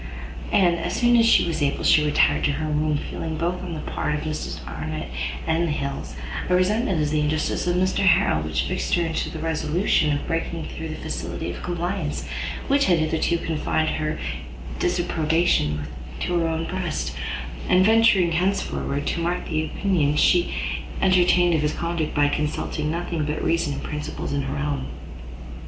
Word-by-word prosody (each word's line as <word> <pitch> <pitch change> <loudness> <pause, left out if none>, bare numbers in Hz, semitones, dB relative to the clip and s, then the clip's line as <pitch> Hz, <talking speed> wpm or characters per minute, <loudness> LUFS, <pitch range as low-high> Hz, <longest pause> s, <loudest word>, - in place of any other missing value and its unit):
And, 175 -3 +4
as 165 - -2
soon 240 -1 +4
as 230 -1 +5
she - - +5
was 165 -2 -2
able, 140 -1 0
she 155 - +5
retired 150 0 +3
to 145 - +2
her 155 +2 -2
room, 150 0 +1
feeling, 160 -1 -4
both 175 +2 -1
on 175 -3 -5
the 155 - -5
part 150 - -2
of 150 - -3
Mr 155 0 -4
Arnott 75 -1 -5 0.4
and 165 +1 +1
the - - -1
Hills, 140 - -4 0.3
a 180 - +4
resentment 190 0 +2
at 150 -1 +1
the 155 0 +1
injustice 155 +3 0
of 175 - +2
Mr 185 +2 +1
Harrel, 175 - +4
which 80 0 -1
fixed - - 0
her 175 - +1
in 165 -1 -2 0.2
the - - -6
resolution 160 +1 +1
of 145 - -1
breaking 165 -1 -2
through 160 0 -6
that 155 - -7
facility - - -4
of - - -8
compliance, 175 -2 -3 0.4
which 280 +1 +3
had 175 -2 +4
hitherto 160 +2 +1
confined 160 -1 0
her 155 0 -2 0.6
disapprobation 160 - +1 0.4
to 175 -1 +1
her 165 - +1
own 165 0 -1
breast, 175 - -3 0.6
and 185 +1 +5
venturing, 220 -5 +5
henceforward, 165 -5 -1
to - - -1
mark 175 +2 -1
the 155 0 0
opinion 155 -5 +1
she 175 +3 +4 0.5
entertained 180 -2 +4
of 160 - +2
his 150 0 0
conduct 170 -2 -2
by 145 -1 +4
consulting 150 +1 -2
nothing 170 -1 -2
but 150 +1 -2
reason 165 -3 +1
and - - -5
principle 150 0 -5
in 140 - +1
her 135 +1 -3
own. 145 -2 -2
160 Hz, 180 wpm, -24 LUFS, 150-175 Hz, 0.6 s, as